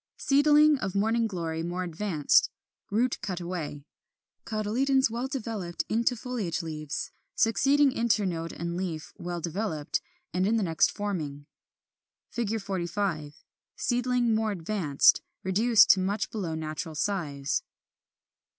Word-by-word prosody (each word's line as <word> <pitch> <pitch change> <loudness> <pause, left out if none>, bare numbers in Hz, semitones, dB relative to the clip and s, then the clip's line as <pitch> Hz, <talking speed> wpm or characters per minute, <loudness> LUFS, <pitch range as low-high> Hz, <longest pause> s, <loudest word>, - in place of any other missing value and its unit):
Seedling 295 +1 +5
of 195 -4 -3
Morning 225 +3 +2
Glory 165 -5 -3
more 175 +2 -3
advanced 170 -3 +2 0.4
(root 235 +5 +1
cut 185 -3 -3
away); 170 -5 -5 0.6
cotyledons 235 +4 +1
well 240 +3 -2
developed 215 -10 -4
into 235 +3 +2
foliage 220 -8 -3
leaves: 155 -2 -4 0.2
succeeding 275 +6 +4
internode 200 -9 0
and 170 +1 -4
leaf 175 -4 -4
well 175 0 -4
developed, 170 -2 -2 0.3
and 180 +1 +1
the 220 +2 +2
next 165 -3 +3
forming. 155 -9 -4 0.9
45. 195 -8 -2 0.3
Seedling 245 -1 +1
more 220 0 +1
advanced; 170 -6 +3 0.2
reduced 210 +3 +5
to 195 - +4
much 200 +3 -1
below 180 -7 -3
natural 155 0 -5
size. 145 -6 -1
195 Hz, 115 wpm, -28 LUFS, 165-230 Hz, 0.9 s, Seedling